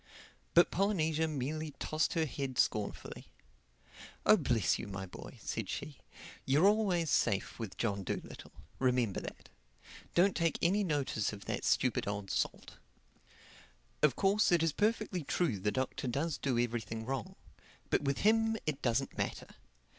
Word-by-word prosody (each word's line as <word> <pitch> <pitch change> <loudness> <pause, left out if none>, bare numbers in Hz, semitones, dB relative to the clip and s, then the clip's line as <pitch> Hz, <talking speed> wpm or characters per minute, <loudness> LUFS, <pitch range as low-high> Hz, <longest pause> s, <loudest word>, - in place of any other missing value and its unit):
But 175 - +6
Polynesia 160 -5 +1
merely 155 +1 -3
tossed 155 0 0
her 165 -2 +1
head 135 -3 -4
scornfully. 105 -2 -1 1.0
"Oh, - - +8
bless - - +1
you, - - -5
my 95 -1 -5
boy," 90 - -10
said - - -3
she, 145 - -5 0.4
"you're 145 +7 +3
always 195 -7 +2
safe 100 +4 +1
with 100 -5 -6
John 100 -4 -1
Dolittle. - - -6 0.3
Remember 125 -6 +1
that. - - -9 0.7
Don't 185 +2 +4
take 165 -2 +1
any 195 +5 +2
notice 140 - 0
of 100 -1 -9
that - - -3
stupid - - +1
old 100 -1 -3
salt. - - -2 1.2
Of 150 -5 +4
course 200 +1 +3
it 170 -2 +4
is 165 -3 +1
perfectly 210 -4 0
true 140 - 0
the 105 +3 0
Doctor 130 +1 -2
does 145 +5 -1
do 130 -4 0
everything 115 -2 -2
wrong. 130 -3 -4 0.6
But - - +3
with 140 -1 -1
him 225 +1 +3
it 150 -2 -2
doesn't 125 +2 0
matter. - - -3
145 Hz, 145 wpm, -33 LUFS, 120-175 Hz, 1.2 s, Oh